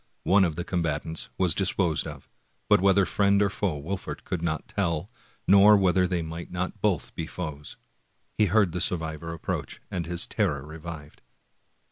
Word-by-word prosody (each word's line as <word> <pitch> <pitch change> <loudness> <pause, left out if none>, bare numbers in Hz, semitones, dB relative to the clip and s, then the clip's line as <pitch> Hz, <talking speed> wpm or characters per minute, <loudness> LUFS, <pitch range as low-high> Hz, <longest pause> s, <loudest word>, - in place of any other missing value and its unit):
One 95 +1 +5
of 85 -4 0
the 85 - -3
combatants 80 -3 -2
was 90 -4 +3
dis 95 +1 +1
posed 85 -6 0
of, - - -9 0.4
but - - +5
whether 100 0 +4
friend 100 +1 +3
or 100 -1 +2
foe 95 -7 -1
Wolfert 95 +7 -5
could 90 - -3
not 80 -2 -2
tell, 85 -3 -1 0.4
nor 100 +2 +8
whether 95 -1 +3
they 90 -2 -1
might 80 +1 -7
not 90 +3 -4
both 100 -7 0
be 80 - -4
foes. 75 -5 -6 0.6
He 105 - +3
heard 100 -1 +3
the 90 +1 -3
survivor 80 -1 -2
approach, 85 - -4
and 85 -3 -3
his 85 0 0
terror 75 -11 -1
revived. 80 -1 -9
90 Hz, 170 wpm, -27 LUFS, 80-95 Hz, 0.6 s, nor